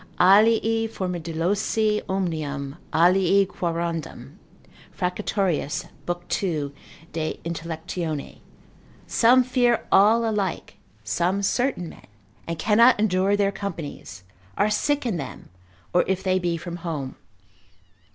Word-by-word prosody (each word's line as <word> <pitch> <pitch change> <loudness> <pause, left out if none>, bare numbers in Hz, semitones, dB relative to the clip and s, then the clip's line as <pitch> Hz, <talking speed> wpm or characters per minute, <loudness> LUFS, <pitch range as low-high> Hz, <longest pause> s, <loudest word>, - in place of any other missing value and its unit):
Alii 225 +3 +5
formidolosi 190 +3 -1
omnium, 155 -7 -2 0.2
alii 185 +3 +4
quorundam 170 -3 -4 0.6
(Fracatorius 180 -4 -1 0.2
lib. 175 0 -3
2. 150 -7 -2 0.4
de 155 -1 -3
Intellect.) 165 +1 -5 1.1
some 250 +2 +5
fear 245 -2 +1
all 225 +3 +5
alike, 200 -5 -2 0.3
some 175 - 0
certain 245 -4 0
men, - - -13 0.4
and 170 0 -3
cannot 225 +7 +5
endure 195 -1 +2
their 200 -1 +2
companies, 160 - -7 0.3
are 210 - +2
sick 290 +6 0
in 220 -7 -1
them, 140 -5 -8 0.4
or 175 - +4
if 190 0 -1
they 185 -1 +2
be 175 -2 -1
from 170 +1 -6
home. 155 -6 -5
185 Hz, 105 wpm, -24 LUFS, 165-210 Hz, 1.1 s, Alii